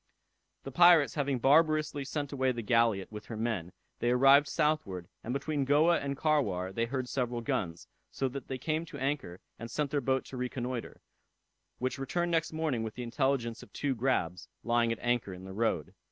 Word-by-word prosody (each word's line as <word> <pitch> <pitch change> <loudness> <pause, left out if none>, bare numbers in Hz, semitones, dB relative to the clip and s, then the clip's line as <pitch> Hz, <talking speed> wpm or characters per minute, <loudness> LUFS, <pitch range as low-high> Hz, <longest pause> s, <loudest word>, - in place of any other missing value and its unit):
The 135 - -7
pirates 165 -4 +6
having 140 -2 0
barbarously 150 +2 +3
sent 145 0 -3
away 130 -2 +1
the 120 -2 -4
galliot 115 -4 +2
with 105 -1 -8
her 110 - -6
men, 110 -7 -2 0.3
they 120 - +1
arrived 135 +3 +6
southward, 150 - -1 0.2
and 115 - -4
between 140 +2 -1
Goa 150 +5 +4
and 140 0 -3
Carwar 100 - 0
they 115 +3 0
heard 130 +1 -3
several 125 -2 -2
guns, 85 -7 -3 0.2
so 135 - -1
that 135 0 -7
they 130 - -3
came 155 +5 -1
to 155 - -9
anchor, 135 -10 -3 0.2
and 115 +1 -6
sent 145 +1 -2
their 145 -2 +1
boat 130 +1 0
to 130 - -8
reconnoitre, 125 -1 -4 0.8
which 130 +2 -2
returned 175 +6 -1
next 165 -1 +1
morning 155 -7 -1
with 110 -1 -5
the 125 - -5
intelligence 120 -1 -1
of - - -14
two 140 -2 -1
grabs, 95 -9 -1 0.2
lying 120 0 +2
at 115 - -2
anchor 120 -6 0
in 90 - -11
the 95 0 -8
road. 100 -8 -1
130 Hz, 190 wpm, -31 LUFS, 115-145 Hz, 0.8 s, pirates